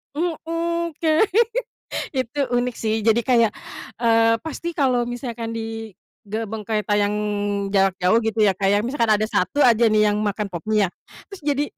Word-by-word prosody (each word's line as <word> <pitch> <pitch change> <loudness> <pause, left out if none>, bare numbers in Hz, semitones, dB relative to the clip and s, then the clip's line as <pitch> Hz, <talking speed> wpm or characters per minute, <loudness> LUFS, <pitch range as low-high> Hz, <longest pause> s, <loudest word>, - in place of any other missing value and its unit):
Mhm, 335 +1 -2
kayak 315 +2 +3 0.9
itu 260 0 -3
unik 245 0 0
sih 220 -1 -1
jadi 225 +1 +4
kayak, 230 -3 +3 0.5
eee, 230 0 +4
pasti 335 +1 -5
kalau 255 -5 +1
misalkan 235 -2 -5
di 225 -2 -6 0.3
gerbong 220 0 -5
kereta 210 -1 0
yang 205 0 +1 0.6
jarak 195 -2 +3
jauh 185 +4 +3
gitu 220 -1 0
ya 200 - +5
Kak 195 +1 -1
ya, 205 - +4
misalkan 235 -3 +2
ada 210 - -1
1 215 +5 +1
aja 235 -1 +5
nih 215 -1 +3
yang 205 - -1
makan 210 -1 -2
Pop 170 -2 -5
Mie 215 -1 +3
ya, - - -4 0.4
terus 390 - -10
jadi 290 0 +2
225 Hz, 170 wpm, -22 LUFS, 210-255 Hz, 0.9 s, ya